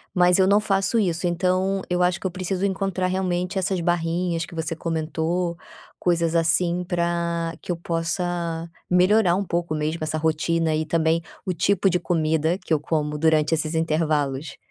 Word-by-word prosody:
Mas 180 0 +4
eu 190 - +5
não 200 +2 +4
faço 195 +2 +1
isso. 175 -4 0
Então 185 +2 +1
eu 180 0 +1
acho 180 0 +1
que - - -3
eu - - 0
preciso 185 +1 -2
encontrar 190 -1 -1
realmente 185 0 -1
essas 190 0 -1
barrinhas 170 0 0
que 175 - -12
você 165 0 -3
comentou 165 +2 -2 0.4
coisas 170 -2 +1
assim, 170 +2 +2
pra 170 -1 -1
que - - -7
eu 175 - 0
possa 170 0 -2 0.2
melhorar 180 +1 +4
um 200 - -1
pouco 170 -2 -2
mesmo 155 +2 -2
essa 155 0 -1
rotina 160 +1 +1
e 155 +1 0
também 160 +1 +1 0.2
o 185 - -1
tipo 195 +3 +2
de 180 -1 +1
comida 160 0 +1
que 185 -4 -1
eu 150 - 0
como 150 -1 -1
durante 155 0 +3
esses 155 0 -2
intervalos. 155 -3 0
170 Hz, 170 wpm, -23 LUFS, 160-180 Hz, 0.4 s, eu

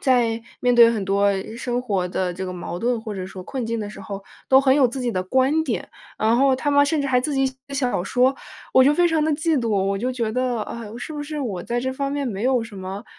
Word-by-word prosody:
在 235 -3 +2 0.2
面 245 -1 +2
对 235 -1 +8
很 215 -4 -2
多 200 +1 +2 0.3
生 245 0 -2
活 195 -7 -1
的 180 0 -2
这 190 - -5
个 185 - -4
矛 175 -1 -6
盾 240 0 0
或 220 -2 -6
者 185 -1 -4
说 190 0 -8
困 260 +1 -4
境 230 0 -2
的 205 -1 -4
时 210 - -10
候， 200 -1 -7 0.2
都 265 0 +7
很 265 -1 +4
有 270 -4 +4
自 260 +3 -5
己 245 -2 -1
的 185 - -1
观 260 +10 +2
点， 235 - -3 0.3
然 220 +2 +3
后 265 0 +4
他 290 +2 -1
们 285 0 +5
甚 305 +1 0
至 280 - -1
还 250 -2 +3
自 295 +3 -2
己 270 0 +2
写 260 - -4 0.2
小 255 -9 0
说， 255 +6 +2 0.4
我 260 - +7
就 280 +3 +5
非 350 +2 +4
常 325 -2 +1
地 315 - +1
嫉 310 +1 +1
妒。 230 - -2
我 195 -1 +1
就 245 +6 -1
觉 230 -4 -2
得， 250 -2 0
唉， 230 0 -7
是 310 - -6
不 295 -1 -4
是 300 0 -5
我 205 -10 -3
在 240 +4 -2
这 260 +1 -2
方 275 +1 -2
面 285 -1 -2
没 210 -3 -4
有 255 -2 +2
什 225 -3 -12
么， 190 +3 -6
245 Hz, 290 characters per minute, -22 LUFS, 205-270 Hz, 0.4 s, 对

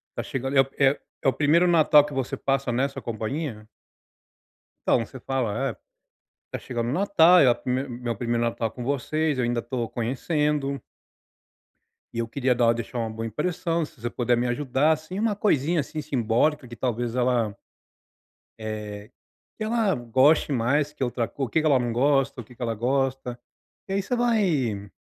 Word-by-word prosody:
tá - - -3
chegando" 135 +1 -3
é 135 - +9
o 135 +1 +1 0.2
é 140 - +1
o 135 - +4
primeiro 165 +4 +3
Natal 155 -3 +6
que 150 - -8
você 135 -2 -2
passa 135 -2 0
nessa 135 +3 -1
companhia? 115 0 -4 1.2
Então, - - +4
você 130 - -11
fala: 130 0 -1
"É, - - -8 0.8
tá - - -4
chegando 120 -2 -4
o - - -1
Natal, 180 -2 +5
é 130 - +6
o 120 - +1
primei 125 +2 -2
meu 120 -1 -4
primeiro 120 +1 -1
Natal 115 -1 -1
com 120 +1 -7
vocês, 145 +2 0
eu 125 - +1
ainda 120 0 0
tô 120 -1 -3
conhecendo" 140 +3 -1 1.3
"e 115 - -3
eu 115 - -1
queria 130 +2 +1
dar 115 -1 +4
deixar 120 +1 -5
uma 115 -1 -2
boa 110 +1 -5
impressão, 165 - -1
se 145 - -18
você 120 - -2
puder 120 -1 +1
me 125 - 0
ajudar, 135 +4 +1
assim, 160 +5 -3
uma 220 -1 +1
coisinha 170 -5 +1
assim 155 +2 -5
simbólica, 130 0 0
que 120 - -9
talvez 120 -1 -2
ela" 120 -4 +1 1.0
"é, 105 -1 -6 0.5
que 215 - -4
ela 220 -3 +1
goste 130 +6 +3
mais 140 +4 +1
que 135 - -4
outra 120 -2 -1
co 140 - -5
o - - -8
que 160 - +2
que - - -3
ela 140 -3 +4
não 120 -1 -1
gosta, 135 0 +2
o - - -10
que 120 +3 -17
que 125 - -16
ela 115 -1 -1
gosta". 130 +1 -1 0.5
E 195 - -3
aí 195 - +1
você 245 - -2
vai, 155 - +1
130 Hz, 185 wpm, -25 LUFS, 120-150 Hz, 1.3 s, é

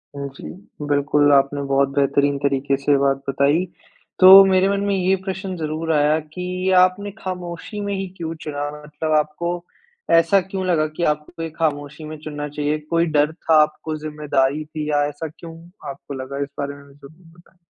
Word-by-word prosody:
हुँ, 140 0 -4
जी। - - -12 0.4
बिल्कुल, 145 0 +2
आपने 140 +1 +2
बहुत 135 0 +3
बेहतरीन 140 0 +2
तरीके 140 -1 0
से 140 +1 -1
ये 140 - +5
बात 135 0 +2
बताई। 145 +6 +2 0.5
तो 190 +1 +11
मेरे 190 0 +3
मन 200 0 0
में 200 -1 0
ये 190 0 +2
प्रश्न 190 -1 -4
ज़रूर 160 +1 -3
आया 150 +1 +3
कि 180 +1 -3
आपने 195 +3 +1
खामोशी 180 0 -6
में 200 0 -3
ही 195 -1 -3
क्यों 165 -1 -4
चुना? 145 -1 -4
मतलब 150 +1 -4
आपको 155 +3 -1 0.7
ऐसा 180 +4 +3
क्यों 190 0 -5
लगा 165 -4 +2
कि 170 - -1
आपको 150 +3 -10
ये 165 - -4
खामोशी 150 -1 -2
में 155 0 -7
चुनना 150 -1 -5
चाहिए? 150 +1 -1
कोई 170 0 +2
डर 150 -1 +1
था 160 -1 +1
आपको, 155 +1 -2
ज़िम्मेदारी 150 -2 -1
थी 155 0 -5
या 145 -1 +2
ऐसा 150 +2 -6
क्यों 165 -1 -10 0.3
आपको 140 +1 -8
लगा? 135 +1 -6
इस - - -6
बारे 140 0 -3
में 140 0 -16
ज़रूर 145 +5 -17 0.2
बताएँ। 175 +1 -24
155 Hz, 185 wpm, -21 LUFS, 145-175 Hz, 0.7 s, तो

